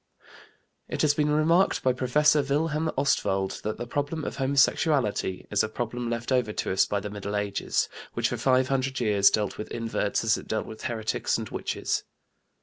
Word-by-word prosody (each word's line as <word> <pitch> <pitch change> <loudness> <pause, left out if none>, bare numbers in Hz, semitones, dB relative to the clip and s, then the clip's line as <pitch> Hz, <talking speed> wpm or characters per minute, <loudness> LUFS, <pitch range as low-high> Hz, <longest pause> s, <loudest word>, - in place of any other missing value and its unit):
It - - -2
has 150 -1 +4
been 150 0 +1
remarked 160 +5 +3
by 130 - +3
Professor 145 +4 +3
Wilhelm 150 +3 0
Ostwald 95 -8 0
that 110 - -3
the 120 - -4
problem 145 +5 -3
of - - -5
homosexuality 135 - +1
is 105 - +3
a 110 - -2
problem 120 +1 -4
left 120 +2 -3
over 125 -4 +2
to 105 - -2
us 95 - +3
by 100 - 0
the 105 +1 -6
Middle 105 0 -4
Ages, 105 -1 0 0.3
which - - 0
for - - -3
five 130 -1 +2
hundred 130 -1 0
years 105 -4 +4
dealt 105 -2 -1
with 105 - -5
inverts 115 -3 -1
as 115 -1 +2
it - - -12
dealt 110 -1 -2
with 110 0 -9
heretics 110 -2 -1
and - - -5
witches. - - -2
120 Hz, 185 wpm, -27 LUFS, 105-140 Hz, 0.3 s, has